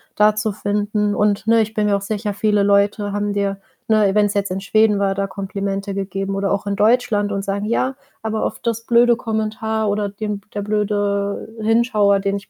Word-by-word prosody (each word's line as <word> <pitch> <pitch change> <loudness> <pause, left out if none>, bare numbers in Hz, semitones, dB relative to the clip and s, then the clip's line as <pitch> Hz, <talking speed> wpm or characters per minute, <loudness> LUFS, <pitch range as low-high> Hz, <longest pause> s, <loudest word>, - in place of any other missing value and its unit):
da 210 0 +4
zu 215 0 -1
finden. 205 0 -1
Und, 205 -1 +1
ne, 230 0 +4
ich 220 0 -2
bin 210 -1 +1
mir 205 -1 +2
auch - - -7
sicher, 205 +1 -3
viele 205 0 +1
Leute 205 +1 +2
haben 205 0 -1
dir, 200 -1 -1 0.3
ne, 210 -3 +3
wenn's 205 -1 +3
jetzt 200 -1 -1
in 190 +1 -3
Schweden 215 +1 +3
war, 195 -1 +1
da 195 0 -2
Komplimente 195 0 -4
gegeben 195 0 -3
oder 195 0 -1
auch 200 +1 -1
in 200 0 -1
Deutschland 210 -1 +2
und 195 0 -2
sagen: 200 +1 -2
„Ja, 255 +4 0 0.3
aber 220 0 -2
auf - - -3
das 230 0 -3
blöde 240 0 +5
Kommentar 220 -1 -2
oder 205 0 -1
den 205 0 -4
der 205 - -2
blöde 205 0 -1
Hinschauer, 215 -3 +3
den 200 0 -1
ich 200 - -12
205 Hz, 200 wpm, -20 LUFS, 200-215 Hz, 0.3 s, blöde